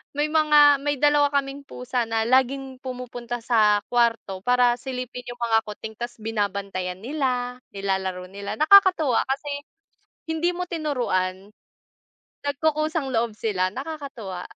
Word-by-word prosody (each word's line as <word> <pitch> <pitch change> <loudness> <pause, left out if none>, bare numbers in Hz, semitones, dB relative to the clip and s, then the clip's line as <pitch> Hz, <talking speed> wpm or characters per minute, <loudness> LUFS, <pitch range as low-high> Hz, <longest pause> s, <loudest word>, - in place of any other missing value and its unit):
may 295 +1 +1
mga, 295 -3 +6
may 290 0 +1
dalawa 290 -1 +4
kaming 280 0 -1
pusa 250 -1 -2
na 225 0 +1
laging 260 +1 +1
pumupunta 245 -2 -5
sa 215 -4 +4
kwarto 230 -5 +1
para 245 -1 +4
silipin 250 -1 -6
yung 240 - -11
mga 225 -1 +3
kuting, 220 +1 -7
tapos 240 0 -5
binabantayan 200 -4 -3
nila, 250 -3 -2 0.2
nilalaro 190 -2 -2
nila, 200 +2 -5
nakakatuwa 325 -6 +6
kasi 275 +2 -2 0.8
hindi 320 +2 +1
mo 360 - -2
tinuruan. 210 - -2 0.9
Nagkukusang 310 0 0
loob 225 -1 +1
sila. 185 -4 0
Nakakatuwa. 265 - -6
250 Hz, 125 wpm, -24 LUFS, 215-285 Hz, 0.9 s, mga